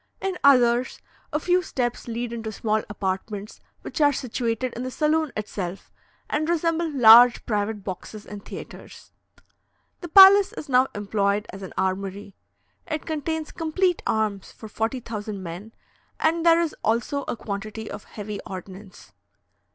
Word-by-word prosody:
In 385 -1 -2
others, 250 -2 +4 0.3
a 300 - 0
few 360 +3 +2
steps 245 -8 -3
lead 235 0 -4
into 225 -2 -5
small 215 0 -1
apartments 200 +1 -4 0.2
which - - -5
are 290 -1 +6
situated 245 -2 -2
in 240 - -6
the 255 - -3
saloon 305 +2 0
itself, 195 -3 -5 0.4
and 310 +2 -1
resemble 330 0 0
large 245 -3 +7
private 210 -1 -2
boxes 205 +2 -7
in 205 - -8
theatres. - - -11 0.9
The 350 - -7
palace 390 +3 +8
is - - -8
now 255 -1 +4
employed 205 0 0
as 195 - -9
an 190 - -8
armoury. 195 +1 -3 0.5
It 310 -2 -4
contains 315 0 -3
complete 350 +3 0
arms 215 -3 -1
for 220 - -11
40,000 220 -3 -4
men, 180 +6 -8 0.5
and 330 +1 +1
there 335 0 +5
is 335 -2 -1
also 235 +6 0
a - - -3
quantity 215 +1 -6
of - - -8
heavy 210 -1 -7
ordnance. 190 +1 -10
230 Hz, 145 wpm, -24 LUFS, 205-300 Hz, 0.9 s, palace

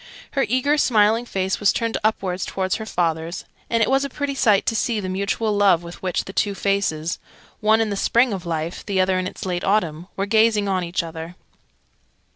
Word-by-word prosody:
Her 275 - 0
eager 280 +5 +2
smiling 225 -1 +3
face 190 -2 -1
was 205 - +4
turned 230 -1 -2
upwards 195 -4 0
towards 190 -1 -1
her 220 -1 -7
father's, 165 -2 -2 0.2
and 230 -1 +2
it - - +1
was 270 +1 +2
a 280 - -3
pretty 285 +1 -3
sight 215 -7 +3
to 225 - 0
see 225 0 0
the 190 - -4
mutual 200 +3 -1
love 195 -4 +4
with 170 0 -10
which 185 -2 -1
the 190 - -8
two 205 -1 0
faces 185 -5 -1 0.4
one 220 +1 +4
in 220 -2 0
the - - -1
Spring 235 +3 +2
of 190 -3 -4
Life, 165 0 -3
the 195 -2 -1
other 185 0 +2
in 185 - -2
its - - -7
late 180 -1 -2
Autumn 175 -5 0
were 195 - -1
gazing 215 0 +3
on 190 -2 0
each 170 +1 -2
other. 165 +1 -7
200 Hz, 210 wpm, -22 LUFS, 180-220 Hz, 0.4 s, was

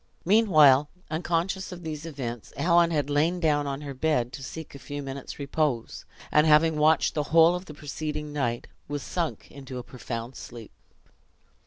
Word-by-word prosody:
Meanwhile, 155 -9 +6 0.2
unconscious 175 +4 -1
of 175 -1 -9
these 155 0 -5
events, 120 - -6
Helen 170 0 +4
had 150 -4 0
lain 155 +5 +1
down 150 -3 +1
on 140 +1 -4
her 140 -2 -6
bed, 130 -3 0
to 140 - -7
seek 160 +4 -8
a 140 - -10
few 145 +1 -6
minutes' 135 0 -7
repose; 140 -4 -2 0.3
and 150 +1 +4
having 155 +1 +5
watched 155 +1 +3
the 150 - 0
whole 165 +1 +6
of 180 +1 -4
the 150 - -10
preceding 150 0 -5
night, 120 -5 -1 0.2
was 145 -1 -4
sunk 170 -3 -3
into 135 -2 -8
a 125 - -5
profound 120 0 -6
sleep. 115 -3 -10
150 Hz, 170 wpm, -27 LUFS, 135-160 Hz, 0.3 s, Meanwhile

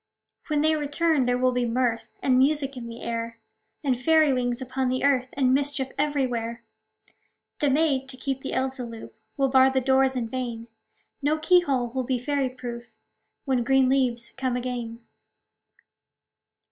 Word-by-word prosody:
When 300 -2 +1
they 315 +1 +3
return, 295 -1 +1
there 245 0 +1
will 255 0 +2
be 245 -1 0
mirth 235 -1 -1
And 255 -1 +3
music 275 0 +2
in 240 -2 -7
the 230 0 -9
air, 230 0 -4 0.5
And 260 -4 0
fairy 315 0 +4
wings 245 -1 -1
upon 260 0 -2
the 255 0 -1
earth, 265 -3 +3
And 260 -2 +2
mischief 275 -1 0
everywhere. 245 -5 -1 1.0
The 290 - +2
maids, 275 -2 +1
to 260 - -11
keep 270 0 -3
the 270 - -5
elves 265 +1 -1
aloof, 230 -2 -7 0.3
Will 270 -1 +2
bar 260 0 +6
the 265 0 +1
doors 265 0 +2
in 240 -2 -2
vain; 235 -1 -5 0.5
No 295 +2 +1
key 355 +3 +4
hole 265 -7 0
will 260 +2 -2
be 255 0 -1
fairy 275 +1 -1
proof, 240 -2 -7 0.6
When 260 -4 +1
green 265 +1 +3
leaves 250 -3 0
come 255 -1 -1
again. 240 -2 -4
260 Hz, 165 wpm, -25 LUFS, 245-275 Hz, 1.0 s, bar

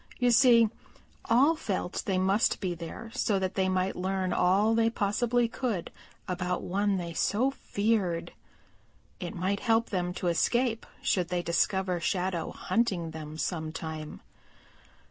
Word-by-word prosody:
You 245 -1 +3
see, 235 -1 +6 0.6
all 270 +8 +4
felt 190 - -3
they 190 -2 +1
must 195 +4 +2
be 185 -3 -2
there 175 +7 -8
so 205 - +1
that 190 -1 -1
they 190 -1 +1
might 185 0 0
learn 185 0 -1
all 195 +5 +3
they 225 0 +3
possibly 235 +3 +1
could 230 -7 -3 0.4
about 180 -1 -2
one 200 +2 0
they 170 -2 -4
so 235 +10 +1
feared. 200 -9 -1 0.9
It - - -5
might 190 +3 -1
help 225 0 +1
them 180 -3 -1
to - - -5
escape 225 +7 +1 0.2
should 180 -3 +1
they 175 0 -2
discover 185 +1 +1
Shadow 180 0 -1
hunting 190 -8 -1
them 155 -1 -8
sometime. 160 -1 -4
190 Hz, 140 wpm, -29 LUFS, 175-225 Hz, 0.9 s, see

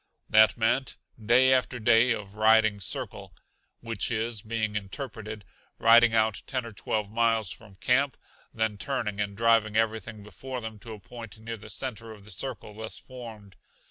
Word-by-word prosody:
That 110 +2 +6
meant 120 +4 +1 0.3
day 125 +4 +5
after 125 -1 +1
day 115 +2 +5
of 105 -3 -4
"riding 110 -1 +4
circle" 95 - -5 0.5
which 115 -3 -1
is, 115 -1 -2
being 110 -1 -2
interpreted, 105 0 -6 0.3
riding 115 +1 +6
out 110 -2 +2
ten 130 -2 -2
or 115 - -7
twelve 105 0 -3
miles 115 -4 +1
from 105 -4 -11
camp, 125 +8 +1 0.3
then 110 -2 -1
turning 105 -3 -2
and 100 -1 -3
driving 115 -2 +3
everything 110 -1 -1
before 125 +5 -7
them 110 -2 -7
to 115 +2 -9
a 105 - -10
point 115 +1 -10
near 115 +1 -6
the 110 +1 -12
center 115 0 -5
of 105 -2 -15
the 105 - -11
circle 110 +2 -6
thus 110 +1 -7
formed. 110 -6 -11
110 Hz, 165 wpm, -28 LUFS, 105-115 Hz, 0.5 s, That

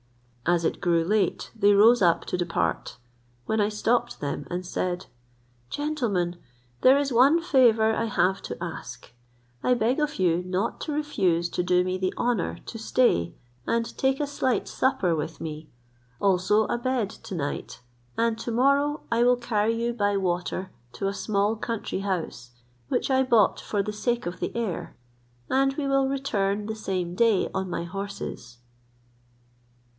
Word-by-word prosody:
As 170 -1 +2
it - - -1
grew 170 -2 +2
late, 210 +2 0
they 205 -2 +4
arose 225 +4 +6
up 170 -3 +3
to - - -2
depart; 175 -1 -2 0.5
when 220 0 +1
I 205 - +2
stopped 235 +3 0
them, 145 -1 -4
and 180 +1 -4
said, 180 +1 -2 0.6
"Gentlemen, 230 - -1 0.4
there 260 +2 +7
is 280 -2 0
one 270 +8 +5
favour 235 -9 +4
I 230 - 0
have 195 -3 +1
to - - -6
ask; - - -7 0.5
I 250 - +3
beg 240 +4 +1
of 300 0 0
you 175 -3 +2
not 185 +4 -2
to 310 - -3
refuse 190 - 0
to - - -1
do 180 0 +3
me 185 0 -2
the 185 0 -1
honour 240 -7 0
to 225 - -7
stay 150 - +2 0.3
and 230 0 -1
take 265 0 +1
a 295 - +1
slight 270 -3 -1
supper 190 -10 +1
with 155 +1 -4
me, 155 -1 -7 0.5
also 195 +2 +3
a 240 - -1
bed 245 -5 -1
to 195 - -8
night, 145 -5 -4 0.4
and 230 -1 +1
to 235 - -5
morrow 280 +5 +2
I 230 +1 +3
will 245 0 +4
carry 230 -2 0
you 235 0 0
by 205 -3 +1
water 185 0 -2 0.2
to 160 +11 -2
a 195 - -1
small 205 +1 0
country 225 -3 -3
house, 175 -11 -3 0.4
which - - 0
I 265 0 +4
bought 235 -6 +3
for 205 -2 -1
the 210 - -4
sake 240 +3 -1
of 175 +1 -5
the - - -3
air, 225 -7 -3 0.5
and 270 +1 +2
we 290 -2 -1
will 275 -1 +2
return 210 -7 -1
the 220 +1 -4
same 185 -5 -3
day 220 0 +2
on 190 -1 -2
my 175 - -3
horses." 195 -9 -6
210 Hz, 165 wpm, -26 LUFS, 180-245 Hz, 0.6 s, there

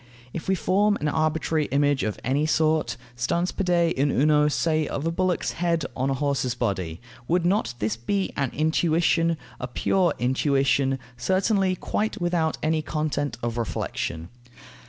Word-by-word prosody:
If 165 - -6
we 190 - +3
form 205 +3 +2
an 150 - -1
arbitrary 155 0 0
image 145 0 +1
of 105 - -2
any 140 +4 +1
sort, 155 -2 +1 0.2
stans 170 +9 0
pede 175 -3 +1
in 140 +2 +1
uno, 150 +2 +3
say 155 0 +1
of 145 - -3
a 165 - +1
bullock's 185 +1 0
head 170 -2 0
on 130 +1 0
a 135 - +1
horse's 135 -3 0
body, 95 -9 -2 0.3
would 175 +1 +1
not 175 - +1
this 110 0 -1
be 190 - -1
an 140 -3 0
intuition, 165 +2 +2 0.2
a 125 - -3
pure 175 +8 +1
intuition, 135 +1 +2 0.2
certainly 190 - +1
quite 215 +4 -2
without 175 -3 0
any 155 0 +1
content 150 -2 -2
of 120 0 -2
reflexion? 85 -6 -3
155 Hz, 155 wpm, -25 LUFS, 135-170 Hz, 0.3 s, we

